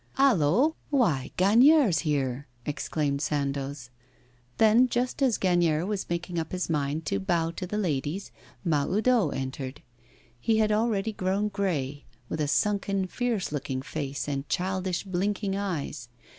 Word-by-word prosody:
'Hallo! 260 - +4
Why, 180 - +2
Gagnière's 230 - +5
here!' 140 -4 -1 0.2
exclaimed 145 -1 -1
Sandoz. 140 -3 -2 0.7
Then, 225 +3 +5
just 245 +4 -1
as 255 -5 +3
Gagnière 175 -3 +2
was 205 -1 -3
making 175 0 -2
up 160 +1 -5
his 180 -2 -2
mind 150 +1 -1
to 100 - 0
bow 165 - 0
to 180 +2 -6
the 210 - -3
ladies, 160 -1 -2 0.3
Mahoudeau 190 - +2
entered. 130 0 -5 0.6
He 220 - +2
had 215 -1 +3
already 215 -1 +1
grown 195 +2 0
grey, 150 -9 -2 0.2
with 155 - -2
a 150 - +1
sunken, 195 +5 +1
fierce 230 -1 -2
looking 135 -3 -3
face 140 -1 -4
and 140 -1 -3
childish, 185 0 -1
blinking 195 +1 -1
eyes. 170 -10 -3
175 Hz, 135 wpm, -27 LUFS, 145-210 Hz, 0.7 s, Gagnière's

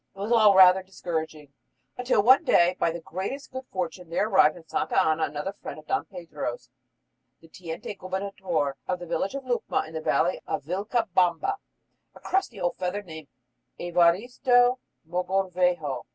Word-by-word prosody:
It - - -14
was 205 +4 -3
all 215 -4 +6
rather 190 0 +7
discouraging, 160 -6 -6 0.4
until 250 -4 +1
one 260 +7 +6
day, 180 - +4
by - - +2
the 170 +1 -5
greatest 195 - -6
good 260 0 -7
fortune, 180 -1 -4
there 185 +5 0
arrived 190 -6 +4
at 165 -2 -15
Santa - - 0
Ana 160 0 +2
another 150 +7 -5
friend - - -9
of 155 - -13
Don 260 - -1
Pedro's, 150 - -7 0.7
the 165 - -18
teniente 165 +3 -7
gobernador 185 -6 -3
of 180 - -1
the 175 - -8
village 195 +7 -2
of 275 -1 -6
Lucma 245 -2 -1
in 160 - -12
the 160 - -4
valley 175 +3 +1
of - - -3
Vilcabamba 185 - 0 0.6
a - - -13
crusty 375 - -2
old 175 -1 -1
fellow 185 +3 -2
named 160 -5 -10 0.5
Evaristo 245 +9 +3 0.3
Mogrovejo. 180 -6 -1
180 Hz, 160 wpm, -26 LUFS, 165-205 Hz, 0.7 s, rather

